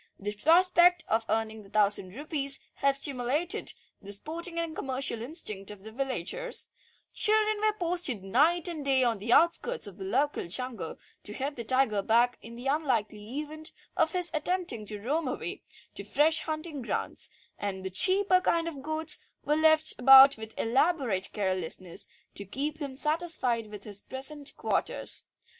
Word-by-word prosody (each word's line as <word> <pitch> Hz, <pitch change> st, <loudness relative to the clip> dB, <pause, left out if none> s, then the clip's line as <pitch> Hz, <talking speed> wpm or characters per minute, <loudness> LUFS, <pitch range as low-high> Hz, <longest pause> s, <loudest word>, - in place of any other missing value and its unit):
The 205 Hz, +1 st, -4 dB
prospect 350 Hz, -, +4 dB
of 225 Hz, +1 st, 0 dB
earning 220 Hz, 0 st, -1 dB
the 195 Hz, -, -16 dB
thousand 200 Hz, -2 st, +1 dB
rupees 280 Hz, -1 st, 0 dB, 0.2 s
had 275 Hz, 0 st, +2 dB
stimulated 280 Hz, -, -1 dB, 0.3 s
the 200 Hz, -, -9 dB
sporting 335 Hz, -, 0 dB
and 335 Hz, -1 st, -2 dB
commercial 260 Hz, -3 st, -2 dB
instinct 220 Hz, -, -4 dB
of 205 Hz, -2 st, -9 dB
the 220 Hz, -, -9 dB
villagers; 270 Hz, -, -3 dB, 0.4 s
children 430 Hz, 0 st, +3 dB
were 430 Hz, 0 st, +1 dB
posted 340 Hz, -, -1 dB
night 310 Hz, -, +3 dB
and 325 Hz, -4 st, -4 dB
day 270 Hz, -2 st, +4 dB
on 230 Hz, -4 st, +1 dB
the 225 Hz, +4 st, -3 dB
outskirts 340 Hz, -, +3 dB
of 200 Hz, -2 st, -9 dB
the -, -, -5 dB
local 260 Hz, +4 st, -1 dB
jungle 225 Hz, -3 st, -3 dB, 0.2 s
to 210 Hz, -, -4 dB
head 280 Hz, +5 st, -3 dB
the 235 Hz, -, -5 dB
tiger 255 Hz, -4 st, +2 dB
back 235 Hz, +4 st, +2 dB
in 230 Hz, +1 st, -10 dB
the 245 Hz, +2 st, -9 dB
unlikely 255 Hz, -4 st, -1 dB
event 310 Hz, +1 st, -5 dB, 0.2 s
of 325 Hz, -3 st, +1 dB
his 360 Hz, -1 st, +1 dB
attempting 310 Hz, -, -1 dB
to 210 Hz, 0 st, -5 dB
roam 290 Hz, +8 st, -1 dB
away 355 Hz, +9 st, -3 dB, 0.3 s
to -, -, -2 dB
fresh 315 Hz, +2 st, +2 dB
hunting 310 Hz, -2 st, -4 dB
grounds, 240 Hz, -, -2 dB, 0.3 s
and 190 Hz, -2 st, -4 dB
the 190 Hz, -, -4 dB
cheaper 370 Hz, -, +5 dB
kinds 335 Hz, -2 st, +1 dB
of 285 Hz, -5 st, -9 dB
goats 315 Hz, +2 st, 0 dB, 0.3 s
were 300 Hz, -, +2 dB
left 315 Hz, 0 st, +4 dB
about 270 Hz, +2 st, +9 dB
with 220 Hz, 0 st, -9 dB
elaborate 245 Hz, -, +1 dB
carelessness 185 Hz, -3 st, -3 dB, 0.3 s
to 200 Hz, -, -3 dB
keep 285 Hz, +10 st, -3 dB
him 280 Hz, -3 st, -5 dB
satisfied 300 Hz, -7 st, 0 dB
with 210 Hz, -1 st, -10 dB
his 205 Hz, -2 st, -4 dB
present 280 Hz, +2 st, -2 dB
quarters. -, -, 0 dB
270 Hz, 160 wpm, -28 LUFS, 220-320 Hz, 0.4 s, about